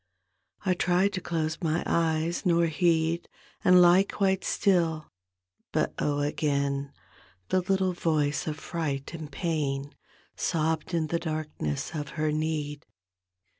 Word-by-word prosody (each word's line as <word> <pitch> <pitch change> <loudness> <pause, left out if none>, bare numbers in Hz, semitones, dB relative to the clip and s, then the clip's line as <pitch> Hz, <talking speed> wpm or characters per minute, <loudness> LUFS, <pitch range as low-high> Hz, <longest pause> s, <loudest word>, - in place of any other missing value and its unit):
I 185 - +3
tried 180 +3 +2
to 185 - -3
close 160 -2 -2
my 165 0 0
eyes 165 0 0
nor 170 -1 +3
heed 165 0 +1 0.3
And 180 0 +7
lie 175 +2 +7
quite 195 -1 0
still 165 -6 +1 0.3
— 90 0 -51
but - - +1
oh, 145 -1 0
again 140 -1 0 0.6
The 185 - +2
little 190 0 +1
voice 155 -4 0
of 155 -1 -2
fright 150 -4 -3
and 155 -3 -7
pain 145 -5 -2 0.4
Sobbed 160 0 -1
in 165 -2 +1
the 170 - 0
darkness 155 - -3
of 150 -2 -4
her 155 0 +1
need. 155 -1 -2
160 Hz, 130 wpm, -28 LUFS, 150-175 Hz, 0.6 s, And